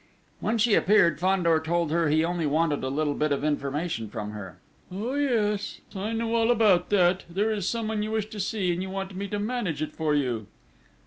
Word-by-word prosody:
When 225 Hz, +2 st, 0 dB
she 225 Hz, 0 st, +3 dB
appeared, 185 Hz, -6 st, +4 dB
Fandor 175 Hz, -3 st, +3 dB
told 165 Hz, 0 st, -1 dB
her 165 Hz, -1 st, +2 dB
he 155 Hz, +2 st, +3 dB
only 170 Hz, -2 st, -1 dB
wanted 150 Hz, -1 st, +1 dB
a 130 Hz, -, -1 dB
little 145 Hz, +1 st, 0 dB
bit 150 Hz, +1 st, 0 dB
of 140 Hz, 0 st, 0 dB
information 145 Hz, -4 st, -2 dB
from 105 Hz, -1 st, -5 dB
her. 95 Hz, -5 st, -8 dB, 0.3 s
"Oh, 215 Hz, +8 st, -3 dB
yes, 225 Hz, -8 st, 0 dB, 0.2 s
I 200 Hz, +3 st, -3 dB
know 230 Hz, 0 st, -1 dB
all 230 Hz, 0 st, +2 dB
about 210 Hz, -7 st, +4 dB
that! 185 Hz, -2 st, +3 dB
There 205 Hz, +6 st, 0 dB
is 200 Hz, -3 st, -1 dB
someone 220 Hz, -2 st, -2 dB
you 215 Hz, -, -2 dB
wish 220 Hz, -1 st, -1 dB
to 215 Hz, -, -7 dB
see, 190 Hz, -2 st, 0 dB
and 175 Hz, -, -3 dB
you 190 Hz, -, -4 dB
want 195 Hz, 0 st, -5 dB
me 200 Hz, +2 st, -4 dB
to 205 Hz, -, -3 dB
manage 205 Hz, -, -2 dB
it 155 Hz, -, -3 dB
for 155 Hz, -2 st, 0 dB
you!" 120 Hz, -7 st, -1 dB
180 Hz, 210 wpm, -26 LUFS, 155-210 Hz, 0.3 s, appeared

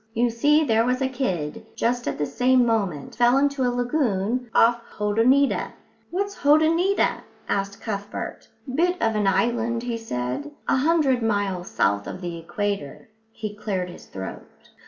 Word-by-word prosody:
You 235 Hz, +1 st, +2 dB
see, 295 Hz, +7 st, +3 dB
there 225 Hz, -5 st, +3 dB
was 250 Hz, +1 st, 0 dB
a 265 Hz, -, +1 dB
kid, 225 Hz, -, -3 dB
just 240 Hz, +1 st, 0 dB
at -, -, -2 dB
the 150 Hz, -, 0 dB
same 250 Hz, -, +3 dB
moment, 200 Hz, -11 st, -1 dB
fell 240 Hz, +2 st, +4 dB
into 280 Hz, 0 st, +1 dB
a 250 Hz, -, +3 dB
lagoon 245 Hz, -2 st, 0 dB
off 235 Hz, +1 st, +4 dB, 0.2 s
Hotoneeta." 230 Hz, +7 st, +2 dB, 0.4 s
"What's 400 Hz, +3 st, -2 dB
Hotoneeta?" 320 Hz, +6 st, +3 dB, 0.3 s
asked 200 Hz, 0 st, -2 dB
Cuthbert. 205 Hz, -2 st, -5 dB, 0.3 s
"Bit 355 Hz, +4 st, +1 dB
of 225 Hz, -1 st, +1 dB
an 210 Hz, -2 st, +1 dB
island," 235 Hz, +2 st, +1 dB
he 240 Hz, -1 st, -2 dB
said, 130 Hz, -, -3 dB, 0.2 s
"a -, -, +3 dB
hundred 280 Hz, -3 st, +2 dB
miles 200 Hz, -5 st, -1 dB
south 100 Hz, 0 st, +1 dB
of -, -, -6 dB
the 175 Hz, -2 st, -5 dB
equator." 200 Hz, -2 st, -4 dB, 0.2 s
He 215 Hz, -2 st, -6 dB
cleared 190 Hz, -4 st, -3 dB
his -, -, -13 dB
throat. 95 Hz, 0 st, -7 dB
230 Hz, 155 wpm, -24 LUFS, 200-260 Hz, 0.4 s, fell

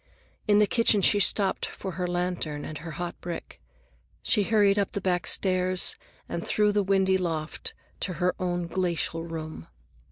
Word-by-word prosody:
In 205 Hz, -1 st, +5 dB
the 210 Hz, -, +6 dB
kitchen 210 Hz, -2 st, +3 dB
she 205 Hz, -, +5 dB
stopped 195 Hz, 0 st, +2 dB
for 190 Hz, -, -6 dB
her 180 Hz, +1 st, -2 dB
lantern 175 Hz, -4 st, -2 dB
and 155 Hz, -, -6 dB
her 165 Hz, +1 st, -7 dB
hot 175 Hz, -1 st, -5 dB
brick. 175 Hz, -1 st, -7 dB, 0.6 s
She 210 Hz, -, +3 dB
hurried 205 Hz, -1 st, +3 dB
up 200 Hz, -, -1 dB
the -, -, -1 dB
back 180 Hz, -2 st, 0 dB
stairs 185 Hz, -1 st, +1 dB, 0.3 s
and 170 Hz, -, -4 dB
through 210 Hz, -1 st, +3 dB
the 205 Hz, 0 st, +2 dB
windy 190 Hz, -1 st, +2 dB
loft 160 Hz, -3 st, -3 dB, 0.2 s
to 185 Hz, -, -2 dB
her 180 Hz, +2 st, +1 dB
own 175 Hz, -1 st, -1 dB
glacial 170 Hz, -2 st, -1 dB
room. 155 Hz, -, -6 dB
180 Hz, 165 wpm, -27 LUFS, 170-200 Hz, 0.6 s, the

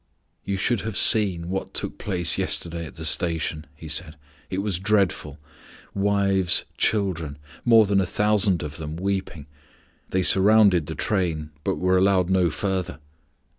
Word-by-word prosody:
"You 100 Hz, -, -3 dB
should 105 Hz, +2 st, 0 dB
have 110 Hz, -1 st, -4 dB
seen 95 Hz, -6 st, +3 dB
what 95 Hz, -, -4 dB
took -, -, -2 dB
place 90 Hz, -5 st, -1 dB
yesterday 85 Hz, -1 st, -3 dB
at 70 Hz, -, -14 dB
the 80 Hz, -, -7 dB
station," 80 Hz, -2 st, -1 dB
he 80 Hz, +1 st, -11 dB
said; 80 Hz, +1 st, -4 dB, 0.3 s
"it 95 Hz, -, -4 dB
was 100 Hz, -5 st, -2 dB
dreadful. 95 Hz, -7 st, 0 dB, 0.6 s
Wives, 100 Hz, -2 st, +1 dB
children, 85 Hz, -9 st, -1 dB, 0.3 s
more 115 Hz, -2 st, +6 dB
than 100 Hz, -1 st, +2 dB
a 95 Hz, -, -2 dB
thousand 105 Hz, -3 st, +1 dB
of 75 Hz, +1 st, -7 dB
them, 80 Hz, -1 st, -6 dB
weeping. 95 Hz, -4 st, -4 dB, 0.6 s
They 95 Hz, 0 st, 0 dB
surrounded 95 Hz, -4 st, +5 dB
the 80 Hz, -, -5 dB
train, 85 Hz, -7 st, -2 dB
but -, -, -1 dB
were 90 Hz, 0 st, +2 dB
allowed 95 Hz, -1 st, +2 dB
no 90 Hz, -2 st, +3 dB
further. 95 Hz, -2 st, -3 dB
95 Hz, 150 wpm, -23 LUFS, 80-100 Hz, 0.6 s, more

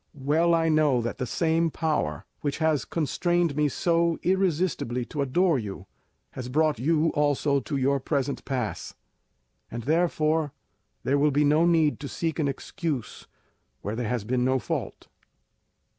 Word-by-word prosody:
Well 155 Hz, +5 st, +2 dB
I 165 Hz, 0 st, +2 dB
know 155 Hz, -5 st, +3 dB
that 120 Hz, -, -4 dB
the 125 Hz, -, -2 dB
same 165 Hz, +4 st, +1 dB
power 150 Hz, -, -2 dB
which 145 Hz, -2 st, -2 dB
has 160 Hz, -4 st, +1 dB
constrained 170 Hz, +1 st, 0 dB
me 150 Hz, -1 st, +2 dB
so 170 Hz, +2 st, +1 dB
irresistibly 175 Hz, -9 st, 0 dB
to 150 Hz, -, -4 dB
adore 155 Hz, +3 st, +2 dB
you, 100 Hz, -4 st, -7 dB, 0.5 s
has 125 Hz, -1 st, -6 dB
brought 155 Hz, -1 st, +1 dB
you 160 Hz, +4 st, +2 dB
also 145 Hz, -1 st, +1 dB
to 140 Hz, +2 st, -3 dB
your 135 Hz, +1 st, +2 dB
present 140 Hz, 0 st, -2 dB
pass, 125 Hz, -6 st, -4 dB, 0.7 s
and 120 Hz, 0 st, -6 dB
therefore 155 Hz, -1 st, +1 dB, 0.5 s
there 140 Hz, +2 st, +2 dB
will 150 Hz, +1 st, +4 dB
be 145 Hz, +1 st, +2 dB
no 155 Hz, +4 st, +4 dB
need 160 Hz, -4 st, +3 dB
to 145 Hz, -, -5 dB
seek 165 Hz, +3 st, -3 dB
an 150 Hz, -, +1 dB
excuse 140 Hz, -, -4 dB, 0.6 s
where 105 Hz, +2 st, -3 dB
there 115 Hz, -2 st, -2 dB
has 125 Hz, -4 st, -1 dB
been 125 Hz, +3 st, 0 dB
no 130 Hz, +1 st, +2 dB
fault." -, -, -4 dB
150 Hz, 155 wpm, -26 LUFS, 130-165 Hz, 0.7 s, will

